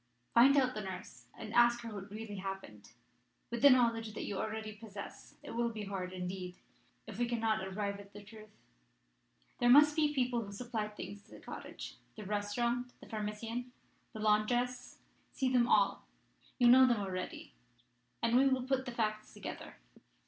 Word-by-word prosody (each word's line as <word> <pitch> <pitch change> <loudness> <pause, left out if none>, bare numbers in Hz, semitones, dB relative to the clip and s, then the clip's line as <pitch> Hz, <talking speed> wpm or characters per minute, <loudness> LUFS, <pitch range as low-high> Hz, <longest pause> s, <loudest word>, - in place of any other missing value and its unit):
Find 270 +4 +7
out 255 -2 +3
the 215 - -4
nurse, 185 - -8
and 220 -1 -7
ask 240 0 +5
her 230 -2 -7
what 200 0 -7
really 210 0 -7
happened. 190 - -7 0.6
With 235 -1 -3
the 285 - +9
knowledge 230 -4 +3
that - - -4
you 200 -2 -3
already 220 0 -3
possess, 205 -2 -10
it - - -8
will 235 0 0
be 220 -2 -6
hard, 190 -2 -4
indeed, 180 0 -5 0.5
if 220 -1 -8
we 240 - +2
cannot 225 -3 0
arrive 200 +1 -3
at 200 0 -13
the 205 0 -11
truth. 215 +1 -13 1.1
There 240 - +4
must 295 +3 +8
be 300 -2 +3
people 250 -2 +1
who 200 -1 -9
supplied 215 -2 -4
things 200 0 -7
to - - -23
the - - -12
cottage - - -8 0.2
the 215 - -8
restaurant, 235 +5 -1
the - - -13
pharmacien, 225 +3 -4 0.4
the 220 - -7
laundress. 240 +4 +1 0.4
See 260 -1 0
them 240 -1 +4
all 200 -3 +3 0.5
you 245 - +5
know 260 +2 +8
them 240 -3 +2
already, 185 -2 -5 0.7
and 230 - +3
we 270 +2 +6
will 260 -1 +1
put 265 0 0
the - - -3
facts 215 -2 -2
together. - - -7
220 Hz, 175 wpm, -34 LUFS, 205-245 Hz, 1.1 s, the